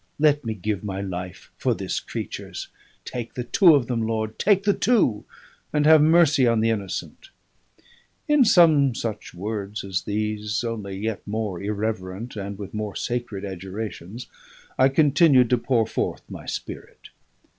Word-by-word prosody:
Let 145 -1 +3
me 110 -2 -3
give 105 0 -3
my 95 -2 -4
life 90 -2 -6
for - - 0
this - - -3
creature's; - - -6 0.4
take 120 -2 -6
the 125 - -3
two 175 - +5
of 135 -4 +2
them, 115 -1 -2
Lord! 110 -1 -2
take 200 -1 +3
the 205 0 +3
two, 200 - +2 0.5
and 150 -1 +1
have 155 0 +7
mercy 155 -4 +5
on 115 -1 +3
the 115 +1 +2
innocent!" 100 -4 -5 1.0
In 295 -3 +5
some 155 - +5
such 110 -5 -5
words 105 +2 -4
as 95 -2 -2
these, 105 0 -2
only 105 -5 -4
yet 110 +1 -3
more 105 -4 -3
irreverent 105 +1 -4
and 100 -1 -5
with 100 -1 -8
more 105 -1 -4
sacred 120 -5 -3
adjurations, 95 +3 -6 0.5
I 130 - +4
continued 140 -3 +4
to 125 - +3
pour 115 -2 +1
forth - - -3
my - - -10
spirit. - - -7
110 Hz, 155 wpm, -24 LUFS, 100-135 Hz, 1.0 s, have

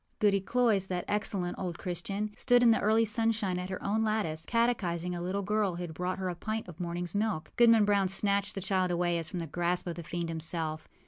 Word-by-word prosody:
Goody 200 -2 +3
Cloyse, 220 -3 +1
that 180 -1 -3
excellent 200 -3 -1
old 175 -3 -4
Christian, 195 +4 -3
stood 245 -1 +4
in 235 - +7
the 225 - +3
early 220 +2 +3
sunshine 215 -4 0
at 180 +1 -5
her 190 - -5
own 215 +2 +1
lattice, 205 -8 -1
catechizing 185 -8 0
a 175 - -4
little 190 +3 -2
girl 205 -2 0
who 175 - -5
had 165 -2 -6
brought 180 +3 -2
her 190 -1 -3
a - - -2
pint 220 +4 -4
of 175 -1 -11
morningâs 175 0 -3
milk. 205 -6 -1
Goodman 230 -3 +6
Brown 200 -2 +3
snatched 200 +1 +1
away - - -2
the - - -7 0.3
child - - -1 0.2
as 160 -1 -2
from - - -5
the 170 - -3
grasp 175 +3 -1
of 175 - -3
the 170 - -8
fiend 170 +2 -4
himself. 160 -1 -3
190 Hz, 225 wpm, -30 LUFS, 175-215 Hz, 0.3 s, in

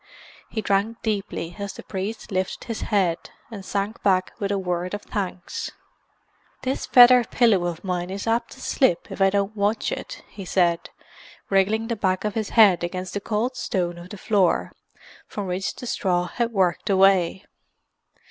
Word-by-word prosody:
He 220 - -3
drank 205 +3 0
deeply 200 -5 -3
as 200 -1 -4
the - - -10
priest 200 +4 -5
lifted 185 -1 -2
his 230 -2 -5
head, 185 -5 +1 0.2
and 205 -3 -7
sank 200 +3 -3
back 185 -2 +2
with 200 -1 -1
a 200 - +1
word 180 0 -2
of 205 - -8
thanks. 185 -3 -4 0.9
"This 260 +1 -2
feather 245 0 +8
pillow 220 -6 +3
of 170 -1 -5
mine 180 -2 -2
is 195 +1 -5
apt 230 +1 0
to 265 - -14
slip 180 -12 +1
if - - -6
I 195 - +6
don't 200 +2 -1
watch 205 +2 0
it," - - -6
he 200 - -9
said, 175 -2 +1 0.6
wriggling 210 +4 +2
the 235 - -1
back 190 -2 0
of 210 - -1
his 220 -1 -2
head 195 -6 +7
against 185 +1 -4
the 205 - -3
cold 225 +5 -1
stone 175 -8 -2
of 175 +1 -11
the 205 - -8
floor, 195 -2 +1 0.6
from 205 - -5
which 185 +1 -2
the - - -8
straw 180 -6 0
had 235 +6 -2
worked 190 -4 +1
away. 190 -1 +3
195 Hz, 175 wpm, -24 LUFS, 185-220 Hz, 0.9 s, feather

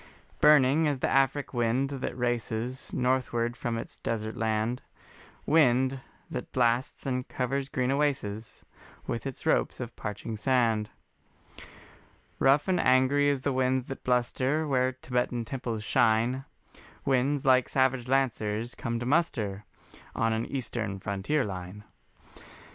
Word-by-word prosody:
Burning 150 +1 +5
as 145 -2 0
the - - 0
Afric 135 +1 +1
wind 120 +3 +1
that 135 -2 -4
races 120 +1 -2
Northward 125 -2 0
from 120 -1 -3
its - - -7
desert 110 -1 -3
land, 110 +2 -1 0.6
Wind 130 -3 +3 0.3
that - - -6
blasts 120 0 0
and 125 -1 -2
covers 135 +2 -2
green 130 -3 0
oases 130 -7 -2 0.4
With 115 - -3
its 135 - -7
ropes 160 - +1
of 120 -2 -6
parching 105 +1 -5
sand. 115 -3 +1 1.5
Rough 135 +4 +4
and 185 -2 +2
angry 130 +3 +4
as 140 -2 -1
the 140 - 0
winds 130 0 +1
that 135 - -7
bluster 130 +5 +1
Where 130 -2 +1
Tibetan 125 -2 -2
temples 120 -4 -4
shine, 115 +5 +2 0.6
Winds 135 +2 +1
like 130 -1 +4
savage 130 -2 +1
lancers 120 -4 0
come 115 -1 -3
to 120 - -4
muster 115 - 0 0.5
On 115 0 +1
an 110 +1 -2
Eastern 115 -6 -3
frontier 100 +9 -1
line. 95 +1 -7
125 Hz, 130 wpm, -28 LUFS, 115-135 Hz, 1.5 s, Burning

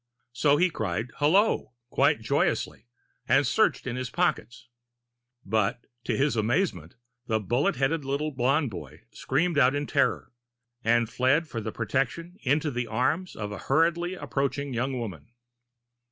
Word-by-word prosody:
So 145 +4 +3
he 180 +2 +3
cried 110 - -3
"Hullo," 165 - +3 0.2
quite - - +3
joyously, 110 - -1 0.4
and - - +4
searched - - +2
in 125 -1 -3
his 130 -1 -3
pockets. 130 -8 -1 0.8
But, 110 +3 0 0.2
to - - 0
his 135 -2 +2
amazement, 110 - 0 0.3
the 110 -1 +1
bullet 120 +7 0
headed 140 +4 0
little 140 +3 -2
blond 135 +1 +1
boy 95 - -9
screamed 170 -3 0
out 130 +1 +4
in 145 0 -1
terror, - - 0 0.5
and 115 +1 +3
fled 130 +7 +1
for 115 -6 -5
protection 165 - -2
into 150 +3 +1
the 120 -1 -3
arms 140 +11 -1
of 105 -1 -5
a 105 - -6
hurriedly 170 +5 +1
approaching 140 -4 -2
young 130 +2 -1
woman. 110 - -7
135 Hz, 140 wpm, -27 LUFS, 115-150 Hz, 0.8 s, and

